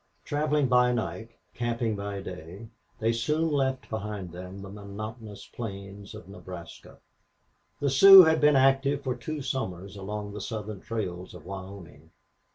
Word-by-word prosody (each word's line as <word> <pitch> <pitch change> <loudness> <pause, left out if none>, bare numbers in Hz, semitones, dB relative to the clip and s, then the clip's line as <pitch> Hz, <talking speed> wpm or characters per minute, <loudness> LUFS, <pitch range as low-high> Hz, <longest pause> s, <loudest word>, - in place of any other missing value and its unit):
Traveling 150 0 +1
by 125 0 +4
night, 110 -1 -3 0.2
camping 115 -2 -1
by 100 -1 -5
day, 90 +4 -9 0.3
they 115 0 +1
soon 150 +8 0
left 135 -2 0
behind 105 -4 -5
them 90 +3 -9
the 100 - -8
monotonous 105 +2 -8
plains 100 -2 -8
of 110 - -11
Nebraska. 90 -3 -10 0.8
The 140 -2 0
Sioux 195 +7 +11
had 160 -1 +3
been 150 -1 +5
active 135 +1 +3
for 130 -2 -1
two 145 +4 -5
summers 100 -8 -4
along 105 +1 -5
the 105 - -6
southern 105 -2 -5
trails 95 -6 -5
of 80 - -12
Wyoming. 95 -4 -9
110 Hz, 145 wpm, -28 LUFS, 95-130 Hz, 0.8 s, Sioux